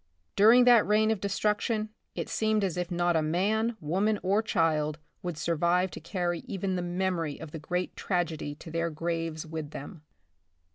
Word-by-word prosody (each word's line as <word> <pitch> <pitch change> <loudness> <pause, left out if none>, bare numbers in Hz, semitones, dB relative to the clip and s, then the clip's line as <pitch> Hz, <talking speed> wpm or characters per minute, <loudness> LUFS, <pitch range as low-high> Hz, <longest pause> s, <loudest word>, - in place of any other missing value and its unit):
During 225 +5 +7
that 245 -3 +6
reign 215 +1 +3
of 215 -4 -1
destruction, 210 +2 0 0.3
it - - -3
seemed 215 -1 +1
as 185 -4 0
if 180 0 -2
not 175 -1 +1
a 160 - +3
man, 210 +8 0
woman 195 +8 +1
or 195 +3 +3
child 155 -7 +1 0.2
would 175 -3 -4
survive 170 +4 +1
to - - -7
carry 175 +1 -2
even 195 -4 -2
the 180 - -1
memory 175 -4 -2
of 160 -2 -8
the 160 - -6
great 180 +4 -3
tragedy 165 -5 -2
to 160 - -11
their 165 +1 0
graves 165 0 -3
with 160 -2 -5
them. 150 +3 -9
175 Hz, 175 wpm, -29 LUFS, 160-205 Hz, 0.3 s, During